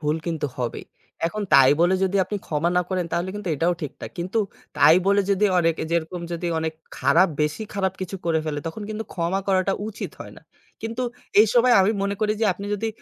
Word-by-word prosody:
ভুল 150 0 0
কিন্তু 160 -3 -1
হবেই। 120 -2 -4 0.4
এখন 210 +5 -3
তাই 135 -1 +8
বলে 175 +2 +4
যদি 190 +1 0
আপনি 205 +3 -4
ক্ষমা 155 +2 0
না 180 - +4
করেন, 185 -2 -1
তাহলে 175 +2 -1
কিন্তু 205 -3 -5
এটাও 170 +4 +1
ঠিক 150 - -4
না। - - -5
কিন্তু 185 +6 -1 0.4
তাই 160 - +7
বলে 200 +1 +4
যদি 200 +1 +2
অনেক 165 -1 +2
এ - - -2
যেরকম 170 +1 -1
যদি 170 +1 -3
অনেক 160 0 -2 0.3
খারাপ 180 +3 +4
বেশি 150 +8 -1
খারাপ 190 -2 0
কিছু 185 +1 -4
করে 165 -1 +2
ফেলে, 150 -2 -2
তখন 165 +7 -5
কিন্তু 215 +1 -4
ক্ষমা 175 +2 0
করাটা 190 0 +2 0.2
উচিত 220 - -6
হয় - - -8
না। - - -15 0.4
কিন্তু 225 +3 -3 0.4
এই 215 - +6
সময় 245 0 +5
আমি 190 +2 +3
মনে 200 0 0
করি 215 0 +2
যে - - +3
আপনি 200 +3 -8
যদি 225 +2 -2
185 Hz, 215 wpm, -23 LUFS, 165-200 Hz, 0.4 s, তাই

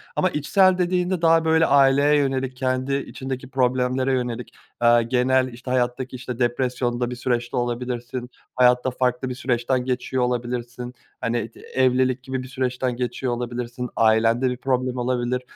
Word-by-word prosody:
ama 185 - +2
içsel 185 +5 +3
dediğinde 180 0 0
daha, 165 0 +4
böyle, 160 0 +4
aileye 140 +1 +4
yönelik 135 -2 0
kendi 130 +1 0
içindeki 130 -1 -5
problemlere 130 0 +1
yönelik, 125 -1 -3 0.3
aaa, 120 0 +5
genel, 130 +2 +2
işte, 125 +2 -7
hayattaki, 130 +1 -1
işte, 125 -1 -6
depresyonda 120 0 0
bir 125 - -4
süreçte 120 0 -2
olabilirsin, 120 0 -3 0.3
hayatta 125 0 +4
farklı 125 0 -1
bir 125 - -4
süreçten 125 -1 0
geçiyor 130 0 -1
olabilirsin, 125 0 -3 0.3
hani, 115 -1 -2
t - - -18
evlilik 130 0 +1
gibi 130 0 -4
bir - - -9
süreçten 130 -1 -2
geçiyor 125 0 -2
olabilirsin, 120 0 -4
ailende 115 +3 +3
bir 125 - -3
problem 130 -1 -1
olabilir, 125 0 -1
125 Hz, 145 wpm, -23 LUFS, 120-130 Hz, 0.3 s, aaa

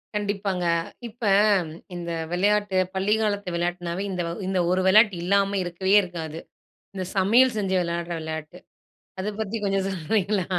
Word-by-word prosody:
கண்டிப்பாங்க. 200 -3 -1 0.4
இப்போ 230 0 -5 0.7
இந்த 170 -1 -5 0.2
விளையாட்டு 205 +1 +1 0.2
பள்ளிக்காலத்து 205 -1 0
விளையாட்டுனாவே, 175 +1 -2
இந்த 180 -1 -2 0.3
இந்த 190 -1 0
ஒரு 185 +1 +2
விளையாட்டு 210 0 +6
இல்லாம 200 +2 +2
இருக்கவே 185 +3 -1
இருக்காது. 165 -3 -6 0.6
இந்த 190 -1 -3
சமையல் 230 +6 +4
செஞ்சு 195 -2 -1
விளையாடுற 170 0 -3
விளையாட்டு. 160 +2 -6 0.6
அத 190 - -3
பத்தி 220 +1 -3
கொஞ்சம் 195 -1 0
சொல்றீங்களா? 195 +2 0
190 Hz, 125 wpm, -25 LUFS, 175-205 Hz, 0.7 s, விளையாட்டு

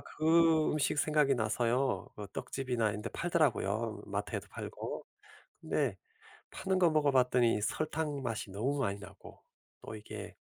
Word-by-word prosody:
그 160 0 +3
음식 150 0 +1
생각이 150 -2 +3
나서요. 120 +3 0
그 105 - -6
떡집이나 125 -5 -1
이런 105 +1 -5
데 - - -3
팔더라고요 175 0 0
마트에도 - - -3
팔고. - - -6 0.6
근데 - - 0 0.5
파는 190 -1 -1
거 175 -2 +5
먹어봤더니 125 -7 +3
설탕 150 +4 -1
맛이 115 -4 -3
너무 130 +9 -1
많이 100 -6 -1
나고 100 - -12 0.5
또 - - -6
이게 105 -1 -8
135 Hz, 290 characters per minute, -32 LUFS, 110-155 Hz, 0.6 s, 거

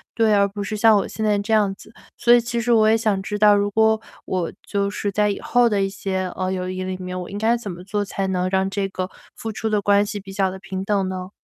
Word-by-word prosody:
对， 225 -2 +3
而 200 0 +4
不 200 +1 -6
是 215 - -4
像 220 0 +6
我 200 - -1
现 220 - -4
在 210 -1 +3
这 205 +2 -4
样 205 -3 +3
子。 215 - -15 0.3
所 240 - +3
以 240 - +7
其 235 0 -3
实 240 +1 0
我 220 -2 +5
也 225 - +5
想 215 -3 0
知 210 0 -4
道， 210 -1 +6
如 205 0 0
果 220 0 +3 0.3
我 180 -3 -2 0.2
就 200 0 0
是 205 0 -2
在 210 +1 +2
以 - - -4
后 245 0 +3
的 205 -2 +1
一 195 - +1
些， 190 -1 -3
呃， 185 0 -2
友 185 -1 -3
谊 185 0 -4
里 185 0 -3
面， 185 0 -5
我 180 - -6
应 200 - -5
该 225 +3 +2
怎 210 -5 -6
么 175 +1 -9
做 205 +2 -2
才 195 0 -3
能 185 -1 0
让 190 0 +1
这 195 0 -1
个 185 -1 -4 0.3
付 225 - -5
出 220 +1 -4
的 210 -1 +1
关 205 +1 +3
系 205 0 -5
比 195 0 -11
较 190 -1 +1
地 190 - -8
平 190 -1 -5
等 195 -2 0
呢？ 185 0 -5
200 Hz, 305 characters per minute, -22 LUFS, 190-215 Hz, 0.3 s, 以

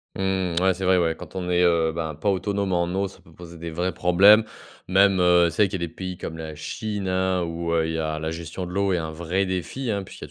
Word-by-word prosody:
Mmh, 95 -2 -1
ouais, 95 0 +3
c'est 95 +1 -4
vrai, 90 0 +4
ouais, 85 -2 +1
quand - - -12
on 90 -1 -3
est, 90 0 +3
heu, 85 -2 +3
ben, 80 -1 -4
pas 80 +7 -2
autonome 100 0 -1
en 85 -1 +2
eau, 100 +1 0
ça 95 - -15
peut 80 - -20
poser 85 0 -12
des 85 0 -6
vrais 90 +3 -1
problèmes. 100 +5 +6 0.4
Même, 95 +1 +4
heu, 90 -1 +5
c'est 105 - +2
vrai 100 - +1
qu'il 95 -2 -4
y - - -1
a - - -1
des 80 - -14
pays 90 0 -6
comme 80 - -6
la 80 -1 -6
Chine, 100 +6 -5
hein, 95 0 +1
où, 85 0 -3
heu, 80 -1 +2
il 80 - -3
y - - -2
a 80 -1 -2
la 80 +1 -3
gestion 85 +2 -6
de - - -8
l'eau 100 +1 +1
est - - +1
un 80 - -4
vrai 85 +4 -1
défi, 95 +8 -3
hein, 100 -2 -1
puisqu'il - - -10
y - - -14
90 Hz, 285 wpm, -24 LUFS, 85-95 Hz, 0.4 s, problèmes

